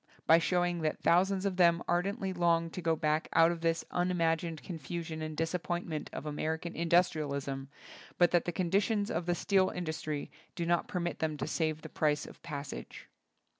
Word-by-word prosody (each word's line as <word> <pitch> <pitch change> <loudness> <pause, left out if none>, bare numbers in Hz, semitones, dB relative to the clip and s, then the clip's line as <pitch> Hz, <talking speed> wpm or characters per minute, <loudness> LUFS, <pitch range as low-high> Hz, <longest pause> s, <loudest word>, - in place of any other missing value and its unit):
by 165 +1 +7
showing 175 0 +1
that 155 -1 -1
thou 175 +1 +6
sands 190 0 -1
of 190 -2 -1
them 170 -1 +4
ardently 190 +2 0
long 170 -2 +2
to 180 - -5
go 165 -1 +2
back 155 0 0
out 165 +1 +6
of 170 -1 -5
this 165 0 0
unimagined 170 -2 0
confusion 165 -1 -5
and 155 -1 -5
disappointment 165 -1 -2
of 135 - -6
American 160 +3 -3
indus 170 +2 +3
trialism, 140 -3 -3 0.5
but 175 -1 +5
that 175 - +3
the 175 - -1
conditions 200 +4 +1
of 170 +1 -2
the 175 - +2
steel 190 0 +2
industry 160 -4 -4 0.2
do 170 - -2
not 170 0 +1
permit 175 -1 -3
them 155 -1 -1
to - - -2
save 155 -2 -1
the - - -6
price 150 -1 0
of - - -10
the - - -15
passage. 140 - -7
170 Hz, 185 wpm, -32 LUFS, 155-175 Hz, 0.5 s, by